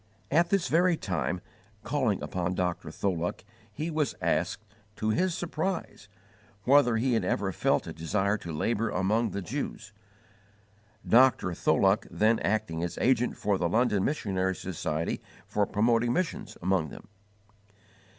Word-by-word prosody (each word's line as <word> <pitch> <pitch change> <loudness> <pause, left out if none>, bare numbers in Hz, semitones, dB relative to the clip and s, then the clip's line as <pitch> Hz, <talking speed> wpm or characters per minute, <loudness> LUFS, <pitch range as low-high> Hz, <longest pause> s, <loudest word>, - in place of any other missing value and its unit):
At 170 +4 +3
this 195 -3 +2
very 175 +1 +3
time, 90 - -2 0.4
calling 115 -6 0
upon 90 0 -2
Dr. 90 -1 -2
Tholuck, 90 -3 -2 0.3
he 155 +10 -4
was 155 -2 0
asked, 110 - -1 0.3
to 110 - -1
his 180 +8 +1
surprise, 175 - -3 0.6
whether 125 -3 +5
he 125 +2 +1
had 110 -4 +1
ever 95 +1 0
felt - - +1
a - - -6
desire 95 +5 0
to 85 - -7
labour 110 +8 0
among 105 +5 +1
the 100 -1 -4
Jews 110 -3 -5 1.1
Dr. 120 -7 +5
Tholuck - - +2
then 110 +2 +2
acting 85 -6 -1
as 85 - -4
agent 125 -1 +2
for 100 -2 0
the 85 - +1
London 110 -1 +2
Missionary 95 -9 0
Society 80 -3 -3 0.2
for 105 -1 0
promoting 115 +2 +2
missions 180 -4 -2
among 90 -4 +1
them. - - -12
105 Hz, 140 wpm, -28 LUFS, 95-130 Hz, 1.1 s, whether